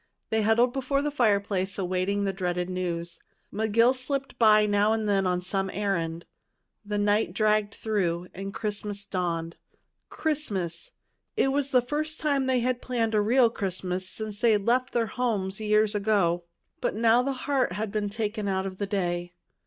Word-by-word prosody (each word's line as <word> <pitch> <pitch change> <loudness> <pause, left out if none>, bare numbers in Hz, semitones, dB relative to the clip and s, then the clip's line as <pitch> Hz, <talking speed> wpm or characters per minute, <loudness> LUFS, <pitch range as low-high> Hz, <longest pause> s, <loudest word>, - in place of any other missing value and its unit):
They 220 0 +2
huddled 230 +3 +3
before 275 +1 0
the 295 - -1
fireplace, 200 -6 +1
awaiting 185 +2 0
the 195 -1 0
dreaded 180 -1 -2
news. 175 -2 -3 0.3
McGill 220 +4 +3
slipped 270 0 -3
by 215 -2 +6
now 205 +1 +3
and 220 -1 -1
then 195 -2 +2
on 180 0 0
some 195 +1 -2
errand. 170 -5 -2 0.6
The 205 0 -3
night 205 -2 +1
dragged 215 -1 +2
through, 180 -5 -1
and 195 +1 -6
Christmas 205 -1 -3
dawned. 170 -3 -3 0.5
Christmas! 200 - -2 0.4
This 270 - +2
was 280 0 0
the 250 -3 +3
first 305 +4 -3
time 280 -3 +1
they 255 -2 +2
had 250 0 0
planned 230 -3 -1
a 210 - +3
real 235 +2 +4
Christmas 185 -3 -3
since 215 -1 -6
they 225 -3 +5
left 240 +5 +1
their 235 -1 +1
homes 215 -5 -2
years 215 0 +2
ago. 200 -5 +1 0.4
But - - -1
now 230 +2 +4
the 275 +2 -1
heart 265 -5 0
had 210 +2 -3
been 210 -1 -1
taken 210 0 -3
out 190 -1 0
of 185 -1 -6
the 200 - -1
day. 175 -3 -2
210 Hz, 170 wpm, -27 LUFS, 190-235 Hz, 0.6 s, by